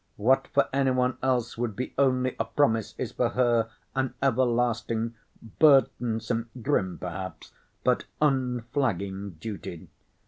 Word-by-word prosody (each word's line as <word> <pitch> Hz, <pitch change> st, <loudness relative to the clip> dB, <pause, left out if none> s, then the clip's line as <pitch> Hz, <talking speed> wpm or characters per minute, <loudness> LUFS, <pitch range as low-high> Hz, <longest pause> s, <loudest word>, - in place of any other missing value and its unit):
What 130 Hz, +5 st, +3 dB
for 140 Hz, 0 st, +2 dB
any 135 Hz, -1 st, +2 dB
one 125 Hz, 0 st, +1 dB
else 125 Hz, -3 st, 0 dB
would 120 Hz, -4 st, -2 dB
be 125 Hz, -, -4 dB
only 130 Hz, -2 st, +2 dB
a -, -, +1 dB
promise 115 Hz, -7 st, +1 dB
is 125 Hz, -, -3 dB
for 120 Hz, -, +1 dB
her 120 Hz, -2 st, +2 dB, 0.2 s
an 130 Hz, -2 st, -1 dB
everlasting 120 Hz, -3 st, +1 dB, 0.5 s
burdensome, 120 Hz, -5 st, +3 dB
grim 105 Hz, -8 st, 0 dB
perhaps, 90 Hz, -2 st, -6 dB, 0.3 s
but -, -, +2 dB
unflagging 120 Hz, -, -1 dB
duty. 95 Hz, -4 st, -7 dB
120 Hz, 125 wpm, -27 LUFS, 110-130 Hz, 0.5 s, What